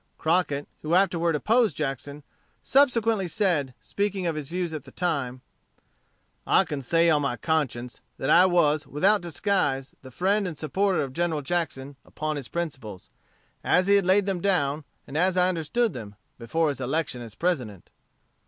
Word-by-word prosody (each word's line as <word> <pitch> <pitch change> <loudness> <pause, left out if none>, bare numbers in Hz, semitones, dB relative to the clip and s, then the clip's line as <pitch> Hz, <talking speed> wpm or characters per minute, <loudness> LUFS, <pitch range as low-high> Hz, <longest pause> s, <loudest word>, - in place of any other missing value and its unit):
Crockett, 160 -4 0
who 155 +3 0
afterward 170 -3 +2
opposed 220 - +2
Jackson, 145 0 -4 0.4
subsequently 230 -8 +3
said, 160 - 0
speaking 200 -2 -2
of 165 -2 -1
his 150 -2 -4
views 175 -1 -3
at 155 -4 -5
that - - -16
time: 140 -8 -2 1.1
"I - - +5
can 145 -2 -5
say 165 +6 +2
on 150 -2 +3
my 140 -4 -1
conscience, 125 -2 -2 0.2
that 135 - -3
I 180 +2 +7
was, 155 -5 +2
without 195 +10 +2
disguise, 170 -6 -1
the 130 - -11
friend 195 - +1
and 165 -4 -6
supporter 190 +5 0
of 135 -2 -6
General 165 -2 -1
Jackson 140 -4 -3
upon 155 0 -4
his 140 -4 -5
principles, 135 - -6 0.5
as 180 - +3
he 200 - +3
had 200 -2 +4
laid 190 +1 +4
them 190 -3 -2
down, 150 -6 0 0.2
and 140 - -10
as 185 +3 +2
I 180 0 +4
understood 185 +6 0
them, 105 -4 -8 0.2
before 155 +7 0
his 140 -2 -4
election 135 -1 -2
as 115 -3 -10
President." 125 - -2
160 Hz, 165 wpm, -26 LUFS, 140-185 Hz, 1.1 s, I